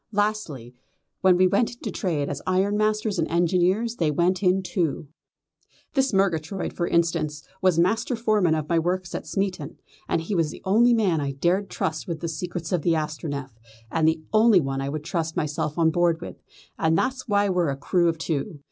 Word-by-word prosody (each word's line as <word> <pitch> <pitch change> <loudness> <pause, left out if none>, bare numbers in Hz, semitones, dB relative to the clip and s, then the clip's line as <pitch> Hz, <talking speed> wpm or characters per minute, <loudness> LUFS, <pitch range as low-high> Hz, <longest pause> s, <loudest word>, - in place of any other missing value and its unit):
Lastly, 205 - -2 0.5
when 185 -1 +4
we 185 - +5
went 200 +6 +1
into - - -6
trade 160 -8 -1
as 145 - -4
ironmasters 210 +2 +1
and 160 - +1
engineers 180 +7 +1
they 160 -3 +1
went 175 +5 +1
in 190 0 +2
too. 170 -5 -2 0.9
This 270 -1 +2
Murgatroyd, 190 -2 0
for 170 - -2
instance, 155 -3 0 0.2
was 185 -3 +3
master 220 +8 +1
foreman 215 -8 +2
of 155 -1 -3
my 170 0 +2
works 180 +2 -2
at - - -5
Smeaton, 190 -7 -3 0.3
and 165 - +1
he 165 +6 -4
was 165 -4 +1
the - - -10
only 235 +5 +4
man 185 -9 +1
I 140 -1 -2
dared 175 +8 0
trust 160 0 -3
with 165 -3 -4
the 170 - -3
secrets 170 0 -5
of 180 -3 +1
the 170 +2 +2
Astronef, 150 -3 -4 0.4
and 160 -1 +2
the 160 0 +1
only 215 -2 +6
one 135 -3 -2
I 135 - -2
would 150 +1 -4
trust 160 0 -3
myself 150 0 -2
on 165 -1 +3
board 170 -1 +2
her 170 - -6
with, - - -13 0.4
and 160 0 +2
that's 260 +5 -1
why 205 -1 +2
we're 180 -4 +1
a 135 - -3
crew 170 +4 +2
of 165 - -2
two. 160 +1 -3
175 Hz, 195 wpm, -24 LUFS, 160-195 Hz, 0.9 s, only